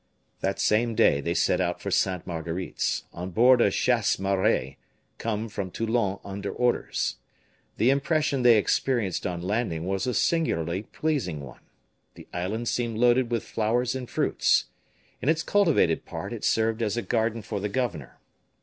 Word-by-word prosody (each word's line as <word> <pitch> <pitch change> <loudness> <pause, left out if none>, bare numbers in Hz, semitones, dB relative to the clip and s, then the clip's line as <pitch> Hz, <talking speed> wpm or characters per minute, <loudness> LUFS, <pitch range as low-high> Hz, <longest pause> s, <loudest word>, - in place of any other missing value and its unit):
That 95 0 -2
same 115 +2 +2
day 70 -8 +4
they - - -2
set - - +2
out - - -1
for - - -5
Sainte 90 -2 +1
Marguerite's, 85 +1 -3
on 90 +2 -5
board 120 +6 +5
a - - +5
chasse 120 -4 +1
maree 95 -9 0 0.4
come 110 0 -2
from 100 -3 -5
Toulon 110 -1 -1
under 100 0 -5
orders. 125 -1 0 0.6
The 120 +5 +4
impression 145 0 +1
they 120 -2 +6
experienced 105 -3 0
on 85 -2 -4
landing 95 -5 -1
was 95 +6 -1
a 125 - -1
singularly 90 - 0
pleasing 110 - -2
one. 60 -4 -11 0.5
The - - -13
island 105 +7 -3
seemed 115 -2 -1
loaded 120 +1 +3
with 120 -2 -1
flowers 120 +3 0
and 130 -2 -5
fruits. - - +2 0.6
In 140 - 0
its 160 0 +2
cultivated 165 - +2
part 80 +7 -6
it 115 - -7
served 115 0 +1
as 110 0 -1
a 120 - -1
garden 115 -1 -1
for - - -4
the 105 +1 -2
governor. 100 - -3
110 Hz, 160 wpm, -26 LUFS, 95-125 Hz, 0.6 s, they